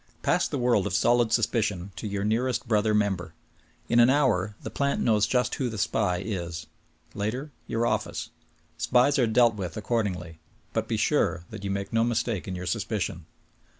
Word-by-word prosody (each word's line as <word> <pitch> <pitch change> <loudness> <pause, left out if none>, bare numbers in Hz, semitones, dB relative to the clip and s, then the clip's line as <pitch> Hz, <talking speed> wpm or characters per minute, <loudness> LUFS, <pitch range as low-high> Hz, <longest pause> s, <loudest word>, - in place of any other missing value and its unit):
Pass - - +2
the - - -3
world 120 -6 +2
of 95 - -2
solid 120 +1 +3
suspicion 105 -5 0
to 110 - -4
your 100 -1 -2
nearest 120 +4 0
brother 110 -1 +2
member. 95 -6 0 0.5
In 120 - +3
an 120 +1 +7
hour 110 -8 +2
the - - -5
plant 140 0 0
knows 105 -3 +3
just 125 -1 +1
v.^ho 130 -3 -1
the 110 - -6
SPY 95 -3 0
is. 85 -5 -4 0.5
Later, 125 +9 -3 0.2
your 115 +1 0
office. - - -2 0.5
Spies 130 +3 +3
are 120 - +4
dealt 120 +1 +4
with 95 -4 -5
accordingly. 95 -8 -2 0.3
But - - -1
be - - -1
sure 85 - +1
that 110 -2 -8
you 100 - -2
make 100 +2 -3
no 115 0 +3
mistake 115 -4 -1
in 95 - -3
your 90 0 -5
suspicion. 100 -5 -2
110 Hz, 180 wpm, -27 LUFS, 95-120 Hz, 0.5 s, an